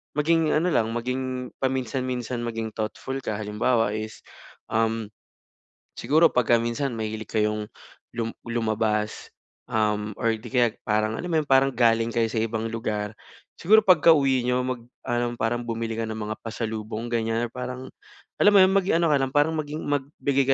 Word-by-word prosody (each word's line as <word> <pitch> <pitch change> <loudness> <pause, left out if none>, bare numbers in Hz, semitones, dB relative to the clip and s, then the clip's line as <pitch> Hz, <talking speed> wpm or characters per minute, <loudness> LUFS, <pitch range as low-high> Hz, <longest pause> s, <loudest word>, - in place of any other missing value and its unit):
maging 160 +1 +2
ano 170 +4 +2
lang, 110 -7 +2
maging 125 +1 -3
paminsan-minsan 130 -1 -2
maging 115 -1 -3
thoughtful 110 +5 -4
ka. 110 - -3
Halimbawa 110 +2 +1
is, 110 0 -7 0.5
um, 110 -1 0 0.9
siguro 155 +7 +4
pagka 120 -1 +3
minsan 120 +3 -2
mahilig 110 -1 -5
kayong 105 -1 0 0.5
lum 115 -1 -3
lumabas, 110 -2 -1 0.4
um, 105 -1 0
or 115 -1 +1
'di 110 +2 -10
kaya 125 -2 +4 0.2
parang 110 0 0
alam 180 - -5
mo 160 - +3
yun, 150 - -9
parang 135 0 +5
galing 115 -1 +3
kayo 115 -1 +1
sa 110 0 -2
ibang 115 0 -2
lugar. 110 -2 -3 0.4
Siguro 215 +5 +6
pagkauwi 145 -8 +5
niyo 125 0 +2
mag-ano, 120 -1 -3
parang 120 +2 0
bumili 115 -1 -3
ka 115 - -2
ng 110 - -4
mga 110 0 -4
pasalubong, 110 0 -4
ganyan. 115 0 0
Parang 125 +1 -6 0.5
alam 205 - +6
mo 205 - +7
'yon, 190 +1 +4
maging 195 -3 +3
ano 170 - +3
ka - - +5
lang, 135 -1 -1
parang 150 +2 +3
maging 155 0 -4
magbigay 140 -1 0
120 Hz, 160 wpm, -25 LUFS, 110-135 Hz, 0.9 s, mo